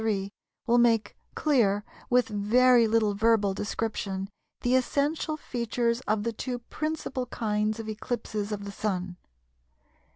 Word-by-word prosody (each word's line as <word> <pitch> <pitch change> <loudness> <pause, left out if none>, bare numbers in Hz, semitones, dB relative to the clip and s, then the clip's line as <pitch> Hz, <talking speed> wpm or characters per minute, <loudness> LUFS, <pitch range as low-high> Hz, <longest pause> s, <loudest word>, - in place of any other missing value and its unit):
3 200 -3 -1 0.3
will 240 0 +4
make 225 -3 +3 0.2
clear, 215 -9 +2 0.3
with 250 -1 +4
very 230 +3 +4
little 215 -2 +2
verbal 210 -1 +3
description, 200 -1 -3 0.3
the 245 - +1
essential 290 +4 +1
features 235 -2 -1
of 215 -1 +1
the 230 +1 -1
two 250 +2 -3
principal 270 0 -4
kinds 215 -1 -1
of 225 - -6
eclipses 215 -1 -3
of 205 -1 -4
the 200 - -5
Sun. 185 -3 -3
225 Hz, 130 wpm, -28 LUFS, 205-245 Hz, 0.3 s, will